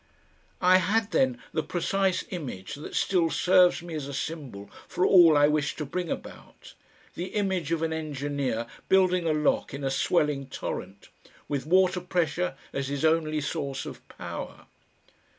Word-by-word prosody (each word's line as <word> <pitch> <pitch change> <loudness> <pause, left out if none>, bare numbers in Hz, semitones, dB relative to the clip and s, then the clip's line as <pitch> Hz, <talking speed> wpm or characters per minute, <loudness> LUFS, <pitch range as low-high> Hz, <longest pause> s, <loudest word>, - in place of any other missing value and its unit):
I 185 +1 +7
had 205 +3 +1
then 130 -6 +2 0.2
the - - +1
precise 185 +3 0
image 130 - -6
that 145 - -8
still 175 -4 +2
serves 180 0 +4
me 170 -1 -8
as 150 -3 -4
a 140 - -6
symbol 135 -11 -5 0.2
for 180 - 0
all 170 -5 +7
I 145 0 +6
wish 150 -1 0
to 150 - -4
bring 175 +4 -3
about, - - -8 0.4
the 175 - -4
image 190 -6 -1
of 165 -1 0
an 160 0 0
engineer 145 -6 -2 0.2
building 185 -2 +3
a - - +3
lock 150 -2 0
in 140 - -6
a 135 - 0
swelling 145 -2 +1
torrent 100 -6 -6 0.4
with 145 0 -3
water 185 +1 +3
pressure 180 -2 -1 0.2
as 140 -1 -2
his 140 +2 -1
only 155 -1 +2
source 140 -1 -3
of - - -10
power. - - -8
160 Hz, 160 wpm, -27 LUFS, 140-180 Hz, 0.4 s, I